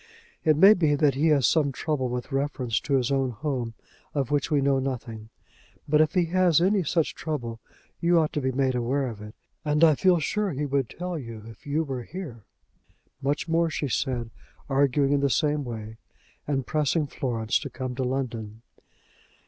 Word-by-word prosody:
It 155 -3 +4
may 195 +6 +9
be 155 -7 +2
that 145 -1 +3
he 145 +5 +1
has 145 -5 +4
some 145 +1 +3
trouble 135 -2 -2
with 125 +3 -4
reference 135 -4 -1
to 140 - -1
his 130 0 +1
own 135 -1 +1
home, 125 -2 -3 0.4
of 140 -3 -1
which 145 -1 +1
we 150 - +3
know 135 -1 +2
nothing. 120 -5 -5 0.6
But 150 +1 +4
if 155 +2 +1
he 180 -2 +3
has 180 -4 +4
any 195 +3 +3
such 165 -1 0
trouble, 120 -8 -4 0.4
you 170 0 +3
ought 155 -2 +2
to 150 - -1
be 130 0 0
made 130 0 +1
aware 125 +3 0
of 110 -5 -6
it, 105 0 -10 0.3
and 150 +1 +1
I 160 -2 +7
feel 180 +4 +3
sure 195 +2 -1
that - - -5
he 150 - 0
would 140 -3 0
tell 180 -2 -4
you 115 -5 -8
if 115 +4 -13
you 150 +3 +1
were 135 -4 -4
here." 130 - -8 0.8
Much 145 +4 -1
more 165 0 +2
she 145 -2 -2
said, 120 -2 -1 0.4
arguing 140 0 +2
in 145 - +3
the 140 0 +2
same 150 +1 +1
way, 110 -3 -7 0.5
and 135 -3 -1
pressing 155 +1 +1
Florence 120 -5 -1
to 140 - -6
come 130 0 -5
to 130 +1 -2
London. 115 -4 -3
140 Hz, 195 wpm, -26 LUFS, 125-155 Hz, 0.8 s, may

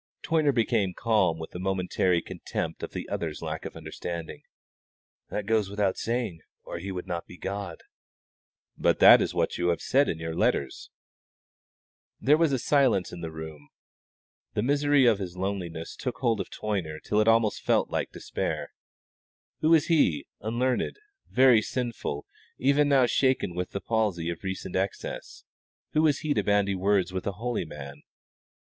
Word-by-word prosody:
Toyner 155 -3 +2
became 110 -6 +1
calm 105 -8 +2
with 80 0 -8
a 90 - -5
momentary 90 -2 +1
contempt - - -5
of - - -5
the - - -5
other's 80 -2 -4
lack 80 0 -4
of - - -7
understanding. 80 +1 -6 0.9
"That 105 - -3
goes 110 -2 +1
without 100 -2 0
saying, 115 -8 -2 0.2
or - - -6
He 95 +3 -5
would 90 -1 -5
not 85 -2 -4
be 90 - -12
God." 95 -3 -5 0.9
"But - - +2
that - - +9
is - - -2
what - - 0
you 85 - +1
have 85 -1 +1
said 140 +2 +2
in 80 - -2
your 80 0 -4
letters." 80 - 0 1.3
There 150 - +5
was 150 -6 +1
silence 130 -10 +3
in 90 - -8
the 85 - -4
room. 80 -2 -9 0.9
The 105 - +1
misery 145 +1 +3
of 115 -4 +4
his 90 -2 -6
loneliness 90 -4 -4
took 125 -3 -4
hold 115 -5 +1
of - - -7
Toyner 90 -8 -3
till 105 +6 0
it 110 - +3
almost 115 -1 +3
felt - - +1
like - - -2
despair. - - -4 0.9
Who 155 - +2
was 160 -2 +5
he, 90 - +2
unlearned, 120 - -1 0.3
very 125 -3 +6
sinful, 115 - -3 0.3
even 140 +3 +3
now 135 -3 +5
shaken 130 -6 +1
with 90 +1 -3
the 100 - -4
palsy 100 -7 0
of 85 - -8
recent 95 -1 -4
excess 95 +1 -4 0.5
who 155 - +2
was 150 -3 +2
he 150 -1 0
to 105 - +1
bandy 100 0 +2
words 95 0 +1
with 95 +1 -3
a 100 - -1
holy 115 -1 -2
man? 70 -2 -9
100 Hz, 165 wpm, -27 LUFS, 85-120 Hz, 1.3 s, that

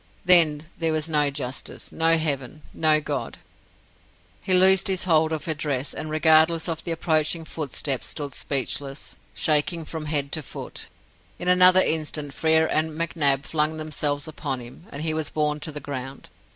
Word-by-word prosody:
Then 160 -5 +5 0.2
there 165 -1 0
was 155 0 -1
no 150 -3 +2
justice, 135 -2 -6
no 165 0 +3
Heaven, 150 -2 -3
no 155 -1 +4
God! 145 -2 -4 1.0
He - - -3
loosed 190 +2 +6
his 190 -2 +1
hold 160 -3 +2
of 160 +1 -3
her 160 - 0
dress, 145 -3 -3
and, 155 - -5
regardless 160 +1 +3
of 165 -2 -4
the - - -5
approaching 160 0 0
footsteps, 140 -4 -3
stood 145 -2 -5
speechless, 140 0 -2 0.2
shaking 155 +2 +2
from 155 -1 -6
head 145 -2 -2
to 155 - -2
foot. 135 - -8 0.5
In 175 - -6
another 180 +1 +6
instant 150 -3 0
Frere 160 +1 +3
and 155 0 -1
McNab 145 -4 +1
flung 155 0 -1
themselves 150 -2 -3
upon 135 -4 -4
him, 125 +8 -13
and 145 +2 -6
he 160 -1 -1
was 155 -2 -2
borne 150 -1 -1
to 155 - -5
the 150 - -6
ground. 135 -1 -8
155 Hz, 165 wpm, -24 LUFS, 145-160 Hz, 1.0 s, loosed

